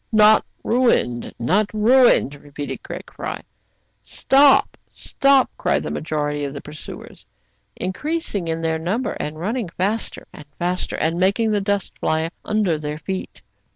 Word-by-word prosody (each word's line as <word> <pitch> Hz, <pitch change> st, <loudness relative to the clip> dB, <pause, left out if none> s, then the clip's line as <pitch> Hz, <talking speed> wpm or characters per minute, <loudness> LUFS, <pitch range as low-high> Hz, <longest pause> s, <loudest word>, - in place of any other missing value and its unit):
"Not 215 Hz, 0 st, +6 dB, 0.2 s
ruined, 230 Hz, -, +1 dB
not 195 Hz, -, +1 dB
ruined!" 235 Hz, -, +5 dB
repeated 145 Hz, 0 st, -7 dB
Fry -, -, -6 dB
Craig. -, -, -6 dB, 0.3 s
" -, -, -45 dB
Stop, 275 Hz, 0 st, +4 dB, 0.2 s
stop! 275 Hz, -1 st, +2 dB
" -, -, -41 dB
cried -, -, +1 dB
the -, -, -4 dB
majority 150 Hz, -2 st, -2 dB
of 140 Hz, 0 st, -4 dB
the -, -, -4 dB
pur -, -, -11 dB
suers, 155 Hz, -, -10 dB, 0.5 s
increasing 210 Hz, -, -3 dB
in 165 Hz, 0 st, -2 dB, 0.2 s
number, 220 Hz, +9 st, -1 dB
and 155 Hz, +1 st, -4 dB
running 215 Hz, +3 st, -2 dB
faster 200 Hz, +6 st, -2 dB
and 150 Hz, -, -11 dB
faster, 180 Hz, +1 st, -2 dB
and 165 Hz, +2 st, 0 dB
making 200 Hz, +4 st, +2 dB
the 205 Hz, -1 st, +1 dB
dust 200 Hz, -1 st, -1 dB
fly 160 Hz, +1 st, 0 dB
under 205 Hz, -7 st, 0 dB
their 150 Hz, 0 st, -4 dB
feet. 190 Hz, +4 st, -6 dB
185 Hz, 150 wpm, -21 LUFS, 155-220 Hz, 0.5 s, Not